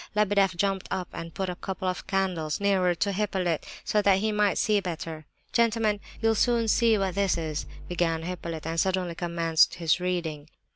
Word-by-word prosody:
Lebedeff 200 Hz, -3 st, +3 dB
jumped 195 Hz, +1 st, 0 dB
up 185 Hz, -2 st, -3 dB
and 165 Hz, 0 st, -6 dB
put 190 Hz, -, -2 dB
a 180 Hz, -, -2 dB
couple 190 Hz, 0 st, -4 dB
of 185 Hz, 0 st, -3 dB
candles 185 Hz, -6 st, -1 dB
nearer 190 Hz, -3 st, +2 dB
to 200 Hz, +4 st, 0 dB
Hippolyte, 190 Hz, -5 st, -1 dB, 0.2 s
so 210 Hz, -, +2 dB
that 200 Hz, -1 st, +4 dB
he 215 Hz, +2 st, 0 dB
might 210 Hz, -1 st, +2 dB
see 210 Hz, -1 st, +3 dB
better. 165 Hz, -4 st, -5 dB, 0.3 s
"Gentlemen, 225 Hz, -3 st, +2 dB, 0.2 s
this—you'll 225 Hz, 0 st, +2 dB
soon 235 Hz, +1 st, +2 dB
see 225 Hz, 0 st, +4 dB
what 195 Hz, -2 st, -1 dB
this 195 Hz, -2 st, +1 dB
is," 155 Hz, -2 st, -3 dB, 0.2 s
began 165 Hz, -2 st, 0 dB
Hippolyte, 170 Hz, -3 st, -5 dB
and 165 Hz, +1 st, -1 dB
suddenly 185 Hz, -1 st, 0 dB
commenced 165 Hz, -1 st, +2 dB
his 165 Hz, 0 st, +1 dB
reading. 165 Hz, -5 st, -3 dB
185 Hz, 180 wpm, -27 LUFS, 170-200 Hz, 0.3 s, that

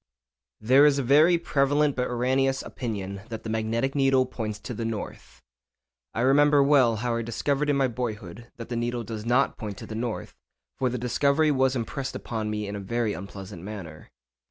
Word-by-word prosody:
_ -, -, -11 dB
There 135 Hz, +4 st, +7 dB
is 145 Hz, -1 st, +3 dB
a 140 Hz, -, 0 dB
very 155 Hz, +7 st, +5 dB
prevalent 145 Hz, -2 st, +1 dB
but 125 Hz, 0 st, 0 dB
erroneous 130 Hz, +2 st, +1 dB
opinion 100 Hz, -5 st, -5 dB
that 110 Hz, -1 st, -6 dB
the 110 Hz, -, -4 dB
magnetic 115 Hz, +4 st, -1 dB
needle 135 Hz, -2 st, +3 dB
points 110 Hz, -4 st, -5 dB
to 125 Hz, -, -6 dB
the 115 Hz, -, -4 dB
north. 115 Hz, -2 st, -6 dB, 0.8 s
I 115 Hz, -, 0 dB
remember 145 Hz, +2 st, +5 dB
well 135 Hz, -5 st, +4 dB
how 120 Hz, +2 st, -1 dB
I -, -, -1 dB
discovered 140 Hz, +6 st, -1 dB
in 145 Hz, -, +2 dB
my 135 Hz, -1 st, +3 dB
boyhood 115 Hz, -3 st, -6 dB
that 115 Hz, -, -8 dB
the 120 Hz, -, -3 dB
needle 120 Hz, 0 st, -2 dB
does 110 Hz, 0 st, -6 dB
not 125 Hz, +3 st, +2 dB
point 105 Hz, -3 st, -5 dB
to -, -, -8 dB
the -, -, -8 dB
north, 115 Hz, 0 st, -4 dB, 0.5 s
for 130 Hz, -, +2 dB
the 125 Hz, -, -3 dB
discovery 140 Hz, +5 st, +2 dB
was 130 Hz, -1 st, +2 dB
impressed 130 Hz, +3 st, -4 dB
upon 110 Hz, -2 st, -4 dB
me 105 Hz, -1 st, -3 dB
in 100 Hz, -, -5 dB
a -, -, -4 dB
very 110 Hz, +2 st, -1 dB
unpleasant 95 Hz, -1 st, -8 dB
manner. 90 Hz, -6 st, -9 dB
120 Hz, 195 wpm, -26 LUFS, 110-135 Hz, 0.8 s, There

